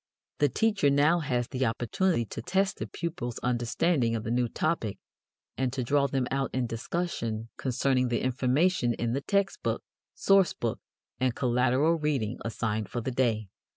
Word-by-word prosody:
The 145 - +4
teacher 200 - +2
now 145 +5 +4
has 125 -6 -1
the 130 -1 0
opportunity 120 - 0
to - - -6
test 195 +1 0
the - - -3
pupils' 170 -9 -4
understanding 120 +1 +1
of 110 - -3
the 115 - -3
new 120 0 +2
topic 135 -6 -1 0.6
and 130 -1 +1
to 130 -2 -1
draw 140 +3 +2
them 135 -1 0
out 135 0 0
in 130 -1 +1
discussion 115 -3 -3
concerning 130 0 +1
the 120 -1 -1
information 130 +1 +2
in 120 0 -1
the 135 - -1
text 200 +5 0
book, - - -1 0.3
source 195 -3 +4
book, 115 -2 -3 0.4
and 130 -2 +1
collateral 130 +6 +2
reading 135 -7 -1
assigned 110 -2 -2
for 120 - -3
the 130 - -3
day. 115 -5 0
130 Hz, 165 wpm, -28 LUFS, 120-155 Hz, 0.6 s, The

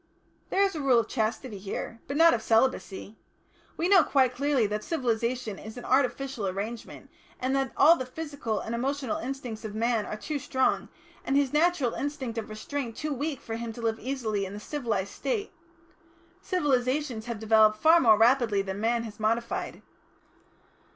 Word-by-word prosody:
"There 390 - +3
is 390 - +1
a 310 - -4
Rule 265 -3 +4
of 230 - +2
Chastity 220 -1 -2
here 210 +3 -6
but 280 - -3
not 330 +1 +7
of 225 - 0
Celibacy. 225 -3 0 0.6
We 340 - +1
know 375 -3 +7
quite 260 -4 +2
clearly 275 -2 +1
that 210 +1 -2
civilisation 240 - -1
is 220 +3 -9
an 245 - -8
artificial 260 -4 0
arrangement, 205 +5 -6 0.3
and 260 +2 0
that 270 -2 0
all 315 +4 +7
the 260 -6 -5
physical 285 -6 -4
and 225 - -5
emotional 265 0 -1
instincts 245 -3 -5
of 215 -1 -6
man 230 -1 0
are 215 - -5
too 295 +6 -4
strong, 260 0 0 0.3
and 270 - -1
his 280 -1 +2
natural 305 -6 +2
instinct 265 -5 -3
of 220 - -7
restraint 230 +2 -5
too 305 -1 -2
weak, 280 +1 -3
for 225 -3 -5
him 230 0 -5
to 235 - -9
live 225 -1 0
easily 225 -6 -2
in 190 0 -5
the 205 - -6
civilised 215 -6 -3
State. 425 -4 -3 0.9
Civilisation 270 - 0
has 235 0 -5
developed 215 0 +4
far 320 +8 +6
more 220 -7 +6
rapidly 225 -3 +3
than 195 +1 -5
man 230 +1 +1
has 220 -2 -9
modified. 230 +2 -2
245 Hz, 175 wpm, -28 LUFS, 220-280 Hz, 0.9 s, not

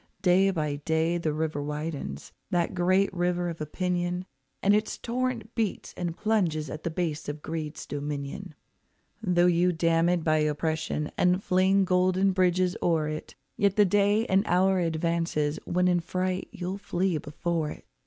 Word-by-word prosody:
Day 190 +1 +5
by 150 -6 -1
day 160 +3 0
the 160 -2 0
river 155 -1 -2
widens, 150 - -5 0.2
that 175 0 0
great 185 +2 +2
river 175 -1 0
of 165 -2 -7
opinion, 180 +3 -2 0.4
And 200 - +5
its 215 +1 0
torrent 240 -2 -3
beats 220 -3 -2
and 175 -1 -4
plunges 175 -9 0
at 155 - -6
the - - -1
base 160 -3 -3
of 145 +1 -6
greed's 155 -1 -5
dominion. 145 +5 -5 0.7
Though 180 -4 +3
you 180 0 +3
dam 165 0 +2
it 175 -2 +1
by 155 -1 +3
oppression 150 0 -1
and 180 +2 +3
fling 190 +1 +3
golden 185 +1 +3
bridges 185 -1 +2
o'er 160 -3 +1
it, 155 0 -6 0.2
Yet 200 -1 +2
the 210 - +5
day 205 +3 +3
and 190 -1 +3
hour 190 +1 +3
advances 165 -2 0
when 180 +1 +1
in 175 -1 +3
fright 185 +2 -2
you'll 185 +2 -4
flee 180 -4 0
before 155 +2 -2
it. - - -10
175 Hz, 160 wpm, -27 LUFS, 155-185 Hz, 0.7 s, Day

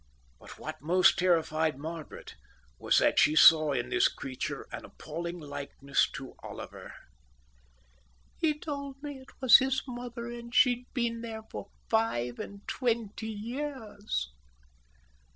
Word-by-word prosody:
But - - -12
what - - -7
most 180 +4 +4
terrified 160 -4 +2
Margaret 160 +2 -7 0.5
was - - +3
that - - +4
she 155 - +5
saw 155 -1 +8
in 140 - -1
this 370 +1 +4
creature 130 -2 -5
an - - -6
appalling 170 +3 -6
likeness 145 -2 -1
to - - -7
Oliver. - - -9 1.5
"He 305 -2 +2
told 280 -3 -5
me 290 -2 -6
it 260 - -17
was 260 -2 +9
his 265 0 0
mother, 240 -1 -6
and 235 0 -8
she'd 250 -1 +3
been 235 -2 -1
there 220 -1 -6
for 200 - -7 0.2
five 125 - 0
and 200 0 -8
twenty 225 -3 -1
years." 215 - -4
220 Hz, 130 wpm, -30 LUFS, 160-250 Hz, 1.5 s, was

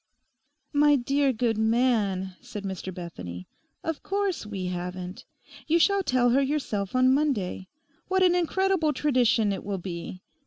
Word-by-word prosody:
'My 295 0 +5
dear 275 +2 +2
good 225 -2 0
man,' 220 -5 +1
said 240 -5 -8
Mr 190 -1 -5
Bethany, 90 - -7 0.4
'of 325 -3 -3
course 390 - -2
we 195 -3 -4
haven't. 180 +1 -5 0.4
You 325 +2 +4
shall 400 +4 +3
tell 250 -8 +2
her 270 +3 +4
yourself 260 -8 -2
on 255 0 +5
Monday. 245 -11 0 0.4
What 380 0 +2
an 360 -1 +5
incredible 355 -2 +1
tradition 245 -7 +2
it - - -5
will 200 -1 -3
be! 180 0 -7
240 Hz, 145 wpm, -27 LUFS, 190-295 Hz, 0.4 s, My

